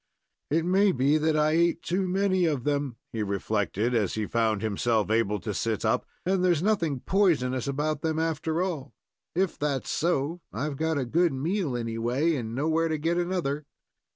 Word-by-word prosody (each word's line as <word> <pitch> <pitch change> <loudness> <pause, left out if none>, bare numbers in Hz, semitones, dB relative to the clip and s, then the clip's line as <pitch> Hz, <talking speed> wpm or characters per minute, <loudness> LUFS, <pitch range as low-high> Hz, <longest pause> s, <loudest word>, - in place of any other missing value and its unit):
"It 160 +3 +1
may 195 +3 +4
be 140 +1 +2
that 155 0 +1
I 150 0 +3
ate 170 +1 +2
too 185 +2 0
many 185 -1 +2
of 145 -6 -1
them," 145 -3 -1 0.2
he 110 - -2
reflected, 105 +3 -1
as 105 -6 +1
he 110 -1 -1
found 110 -2 0
himself 110 0 0
able 105 -2 +1
to 105 - -3
sit 110 +2 -1
up, - - +1 0.2
"and 185 0 +1
there's 175 -3 +3
nothing 170 -11 +1
poisonous 140 - +1
about 150 +2 -1
them, 160 -1 -1
after 160 +1 0
all. 155 -7 -4 0.4
If 185 0 0
that's 145 -3 -1
so, 165 0 0
I've 140 +5 -3
got 160 0 0
a 135 - 0
good 165 +5 +2
meal, 155 0 -1
anyway, 120 +7 0
and 115 -5 -3
know 145 +4 0
where 165 +1 +2
to 160 -1 -1
get 165 +3 0
another." 165 -5 -2
150 Hz, 180 wpm, -27 LUFS, 120-170 Hz, 0.4 s, may